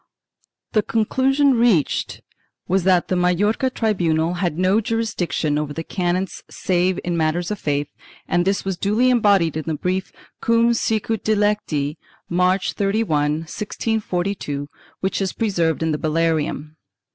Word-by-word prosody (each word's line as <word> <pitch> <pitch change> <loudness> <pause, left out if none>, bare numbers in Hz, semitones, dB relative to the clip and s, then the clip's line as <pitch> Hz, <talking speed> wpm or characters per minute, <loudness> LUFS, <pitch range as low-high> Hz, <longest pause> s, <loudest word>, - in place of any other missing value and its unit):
The 215 - +3
conclusion 265 +6 +2
reached 220 - +1 0.5
was 190 0 +1
that 185 -2 +3
the 185 - 0
Majorca 190 +8 +2
tribunal 175 -9 0
had 175 -3 -2
no 185 +4 +3
jurisdiction 205 -9 -1
over 150 -1 -3
the 165 - -4
canons 180 +1 -2
save 180 0 0
in 175 -1 -1
matters 170 +3 0
of 210 - -3
faith 145 -1 -1 0.4
and 175 - +2
this 195 +2 0
was 190 -2 -2
duly 225 +6 +2
embodied 200 - +3
in 155 - -4
the 160 - 0
brief 185 +4 -2 0.3
Cum 230 +1 +3
sicut 225 -1 -1
dilecti, 205 -9 0 0.3
March 180 +2 +1
31, 160 -8 0
1642, 185 -7 -3 0.3
which 190 +1 -1
is 190 -2 -1
preserved 170 -8 0
in 160 - +1
the 150 - -1
Bullarium. 155 -1 -1
185 Hz, 135 wpm, -21 LUFS, 160-210 Hz, 0.5 s, The